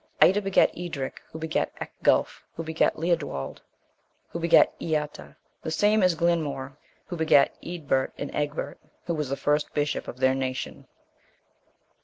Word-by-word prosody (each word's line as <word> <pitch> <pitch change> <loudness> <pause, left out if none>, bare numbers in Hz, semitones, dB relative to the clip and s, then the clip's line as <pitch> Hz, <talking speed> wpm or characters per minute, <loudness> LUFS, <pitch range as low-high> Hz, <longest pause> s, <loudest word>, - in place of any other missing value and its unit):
Ida 200 +3 +6
begat 195 -1 +3
Eadric, 165 -6 -5
who - - -7
begat 160 0 -1
Ecgulf, - - +1
who 165 - -4
begat 160 0 +1
Leodwald, 160 - -2 0.7
who 170 - -5
begat 170 0 +5
Eata, 150 -2 -3 0.3
the - - -4
same 210 +6 +3
is 180 -2 +4
Glinmaur, 155 -5 0 0.3
who 180 - -5
begat 160 -4 +4
Eadbert 145 -6 -1
and 145 - -5
Egbert, 150 +1 -3 0.3
who 170 - -1
was 150 -4 -2
the 140 - -2
first 150 0 +1
bishop 145 0 -1
of - - -7
their 130 0 +3
nation. 130 -1 -4
155 Hz, 145 wpm, -26 LUFS, 140-170 Hz, 0.7 s, Ida